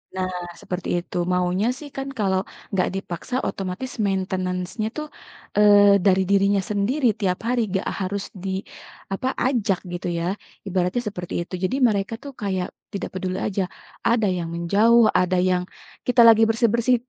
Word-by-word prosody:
Nah, 185 0 -1 0.3
seperti 180 -1 -4
itu, 175 - -7 0.2
maunya 180 +3 +1
sih 295 - -9
kan 270 0 -3
kalau, 190 -2 +2 0.3
nggak 185 -2 +1
dipaksa, 195 +5 -5
otomatis 195 +7 -4
maintenance-nya 185 +1 -1
tuh, 305 0 -3 0.5
eee, 205 -1 +7
dari 190 -1 +5
dirinya 200 0 +3
sendiri 240 +7 +1
tiap 185 -4 0
hari, 245 0 +2
nggak 190 0 -1
harus 195 +1 -2 0.2
di, 195 - -2 0.6
apa, 225 +7 -2 0.2
ajak 225 -8 +1
gitu 175 - -4
ya, 170 - -2 0.4
ibaratnya 185 +4 0
seperti 180 -4 -7
itu. 170 - -9
Jadi 185 +8 +1
mereka 200 +1 -1
tuh 285 - -7
kayak, 190 -3 -1 0.3
tidak 200 - -3
peduli 185 0 -3
aja. 200 -2 0 0.5
Ada 230 -2 +3
yang 170 -1 -3
menjauh, 210 +7 +4 0.2
ada 180 0 +1
yang 180 -1 +1 0.4
kita 250 -1 +5
lagi 225 0 +6
bersih-bersih, 235 +2 +3
195 Hz, 150 wpm, -23 LUFS, 185-225 Hz, 0.6 s, eee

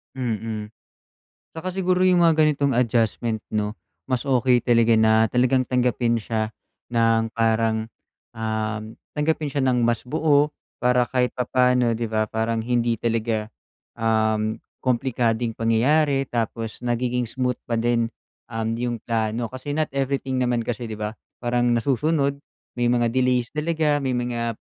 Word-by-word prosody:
Mm, 110 -4 -3 0.9
saka 180 +3 -3
siguro 185 -1 +2
yung 180 -1 +4
mga 165 -2 +4
ganitong 140 -2 +1
adjustment 115 -2 +1
'no, 105 -1 -1 0.3
mas 130 -2 -1
okey 125 -2 +3
talaga 115 -1 +4
na 110 0 +4
talagang 125 +2 +2
tanggapin 125 -2 +1
siya 110 0 -2 0.4
ng 115 -1 +2
parang, 110 -1 +1 0.5
uhm, 110 0 -3 0.2
tanggapin 150 0 0
siya 140 -1 -1
ng 125 -2 +2
mas 120 0 +1
buo 150 +1 +2 0.2
para 125 -1 +2
kahit 125 -1 +1
papaano 125 -2 +2
'di 115 - -2
ba, 110 -1 -1
parang 110 0 -1
hindi 120 0 +1
talaga, 115 -2 -1 0.5
uhm, 110 -1 +1 0.2
komplikadong 120 -2 0
pangyayari. 135 +5 +2
Tapos 115 0 -3
nagiging 125 +1 0
smooth 125 +1 -2
pa 120 - -3
din, 115 0 +1 0.4
uhm, 115 0 -2
yung 120 0 -2
plano. 115 0 -1
Kasi 130 +3 -6
not 155 0 0
everything 135 -1 -1
naman 125 -2 +1
kasi 120 0 -4
'di 110 - -6
ba, 105 +1 -5 0.2
parang 120 0 +1
nasusunod, 140 +4 +1 0.4
may 120 - +1
mga 120 -1 +2
delays 125 -1 +1
talaga, 155 -1 0
may 135 -3 -1
mga 120 -1 -1
120 Hz, 140 wpm, -23 LUFS, 115-130 Hz, 0.9 s, yung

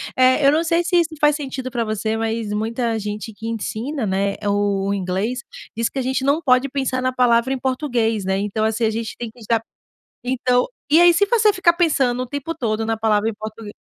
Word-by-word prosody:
É, 255 +2 +4
eu 280 - +7
não 320 +2 +2
sei 335 +1 +1
se 355 +1 0
isso 330 -2 +1
faz 295 -1 +4
sentido 265 -3 -5
para 235 -2 -1
você, 220 0 -2
mas 225 -1 -2
muita 225 +1 -1
gente 210 +2 -5
que 225 +2 -8
ensina, 230 +4 -3
né, 195 +1 0
o 200 -1 0
inglês, 195 +6 -2 0.4
diz 230 +1 0
que - - -9
a 265 - +1
gente 260 0 -1
não 285 +4 +2
pode 255 -1 +3
pensar 265 -1 -1
na 255 0 0
palavra 245 0 +2
em 260 - -3
português, 245 -6 -1
né. 190 0 0
Então 210 +2 -2
assim, 220 +1 +1
a - - +2
gente 225 0 -4
tem 235 -2 -6
que 245 - -20
usar 225 0 0 0.6
então, 250 0 +1 0.3
e 320 - +7
aí, 350 0 +7
se 405 +4 +3
você 435 -3 +4
ficar 370 -2 +4
pensando 270 -8 +1
o - - -8
tempo 285 +4 -4
todo 225 -7 -2
na 225 0 -1
palavra 220 0 +1
em - - -4
português 215 0 -8
235 Hz, 220 wpm, -21 LUFS, 220-270 Hz, 0.6 s, eu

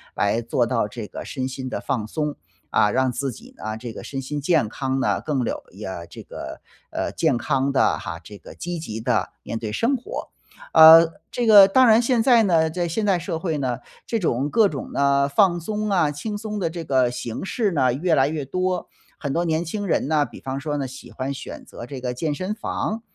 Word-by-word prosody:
来 105 +3 +1
做 120 +1 0
到 115 -2 0
这 105 0 -7
个 - - -7
身 130 -1 -4
心 130 0 -5
的 - - -3
放 115 -6 -2
松。 150 +5 -3 0.3
啊， 105 - +3
让 130 +2 +2
自 135 +1 -2
己 110 - -13
呢， 110 0 -5
这 115 0 -7
个 - - -8
身 135 -1 -5
心 145 +2 -4
健 155 -5 +2
康 135 +4 -2
呢， 135 - +1
更 140 -5 -1
有 - - -3
一 - - -9
呃， 90 -3 -6
这 - - -11
个， - - -8 0.3
呃， - - -3
健 155 -7 +1
康 135 +3 0
的 135 - +3
哈， 85 - -6
这 100 +4 -11
个 - - -13
积 175 0 -5
极 110 -9 -6
地 110 - 0
面 115 - -5
对 110 -1 -4
生 235 - +1
活。 245 - -6 0.5
啊， 160 0 +11 0.3
这 245 -2 -1
个 200 -3 +9
当 255 +4 +5
然 225 +1 +6
现 240 -1 +2
在 235 -1 +5
呢， 165 -5 +3
在 175 +2 -2
现 190 +6 -1
代 195 -3 +3
社 170 -1 -4
会 160 -3 -2
呢， 130 -4 -1 0.3
这 230 - -1
种 140 -5 0
各 220 +4 +4
种 145 -8 -6
的 140 0 +2
放 175 +4 +3
松 215 +4 -2
啊， 175 -7 +2
轻 205 +9 -4
松 210 0 -5
的 170 -4 0
这 165 0 -6
个 130 -5 +2
形 120 +3 -5
式 210 0 0
呢， 130 -7 +2
越 165 +6 0
来 135 -2 +4
越 150 -1 -3
多。 185 +6 -2 0.3
很 140 - -4
多 170 +5 0
年 160 0 0
轻 200 +4 -4
人 155 - 0
呢， 150 -2 +3
比 120 - -12
方 135 0 -4
说 145 +2 -3
呢， 140 -2 -2
喜 130 -1 -10
欢 130 +5 -4
选 140 - -8
择 - - -9
这 130 0 -8
个 125 -1 -2
健 145 +4 -2
身 185 +6 -3
房， 215 +1 -3
145 Hz, 245 characters per minute, -23 LUFS, 130-185 Hz, 0.5 s, 啊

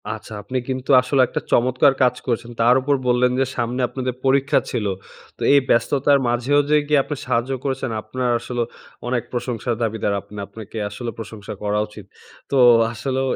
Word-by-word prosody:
আচ্ছা। 110 0 -7
আপনি 125 +6 -3
কিন্তু 130 0 -4
আসলে 130 +1 +2
একটা - - -3
চমৎকার 130 +3 +4
কাজ 125 -1 +3
করেছেন। 120 -1 -2
তার 120 +2 +5
উপর 140 +2 +1
বললেন 125 0 +3
যে, 135 - +3
সামনে 120 +1 -1
আপনাদের 125 +1 -3
পরীক্ষা 135 +1 +3
ছিল। 115 -5 -2 0.5
তো - - -19
এই 140 - +7
ব্যস্ততার 140 +3 +3
মাঝেও 125 +4 +2
যে, 150 - +4
গিয়ে 150 -2 +4
আপনি 150 - -4
সাহায্য 120 +3 0
করেছেন, 135 -2 -2
আপনার 125 +4 -3
আসলেও 120 0 -3 0.4
অনেক 120 -2 0
প্রশংসার 120 -1 -2
দাবিদার 110 -2 -1
আপনি। 100 +1 -15
আপনাকে 110 +2 -10
আসলেও 115 +3 -6
প্রশংসা 110 -2 -7
করা 105 0 0
উচিত। 105 -2 -12 0.5
তো 140 - +2 0.4
আসলেও 130 +3 -2
125 Hz, 170 wpm, -21 LUFS, 115-130 Hz, 0.5 s, এই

